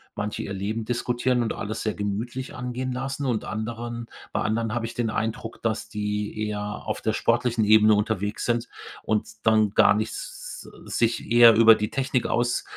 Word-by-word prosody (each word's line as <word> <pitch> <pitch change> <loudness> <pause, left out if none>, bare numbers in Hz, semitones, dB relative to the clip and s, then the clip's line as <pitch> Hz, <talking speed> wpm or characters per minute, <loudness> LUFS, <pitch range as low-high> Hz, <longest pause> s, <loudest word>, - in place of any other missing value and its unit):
manche 105 0 -3
ihr 100 - -5
Leben 105 +4 -3
diskutieren 120 +1 0
und 110 - -2
alles 110 +2 -4
sehr 110 - -1
gemütlich 110 +6 -4
angehen 125 +1 -4
lassen 135 +2 -3
und 120 -5 -1
anderen 115 +2 -4 0.3
bei - - 0
anderen 110 +1 -1
habe 120 -1 -1
ich 115 - -6
den 120 -2 0
Eindruck, 110 +1 -3
dass 115 -1 -1
die 105 0 -3
eher 105 -1 -3 0.2
auf - - -3
der 110 - 0
sportlichen 115 -1 +1
Ebene 110 0 +6
unterwegs 105 -1 -1
sind 120 0 0 0.3
und 110 -1 0 0.2
dann 110 -2 +4
gar 100 - +5
nichts 110 +1 -5 0.2
sich 115 -1 -1
eher 120 -2 +8
über 115 0 +8
die 105 0 -2
Technik 135 -2 0
aus 120 0 0
115 Hz, 175 wpm, -25 LUFS, 105-120 Hz, 0.3 s, eher